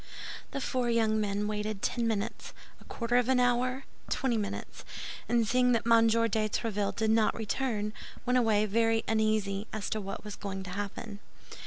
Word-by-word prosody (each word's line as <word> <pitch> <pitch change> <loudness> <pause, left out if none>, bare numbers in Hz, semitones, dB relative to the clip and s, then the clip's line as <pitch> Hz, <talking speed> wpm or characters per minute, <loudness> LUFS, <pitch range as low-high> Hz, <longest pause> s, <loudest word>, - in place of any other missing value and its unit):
The - - -4
four 250 -2 0
young 220 -2 +2
men 205 0 -1
waited 210 -1 -3
ten 235 -2 +1
minutes, 215 -2 -3 0.3
a - - -16
quarter 235 +1 0
of 245 0 +2
an 260 -1 +4
hour, 250 +2 +2 0.3
twenty 260 -3 +1
minutes; 210 -2 -4 0.5
and 235 -2 +3
seeing 250 +2 +4
that 230 - +1
M. 230 -1 +6
de 225 +1 +3 0.3
Tréville 205 -2 -1
did 220 -1 +1
not 220 -1 +3
return, 215 -1 -1 0.3
went 250 0 +3
away 215 -3 +3
very 225 +2 +2
uneasy 215 -2 +1
as 215 -2 -4
to 215 - -1
what 195 0 -6
was 210 -1 -6
going 195 -2 -5
to 185 - -7
happen. 205 +1 -5
220 Hz, 175 wpm, -30 LUFS, 210-235 Hz, 0.5 s, M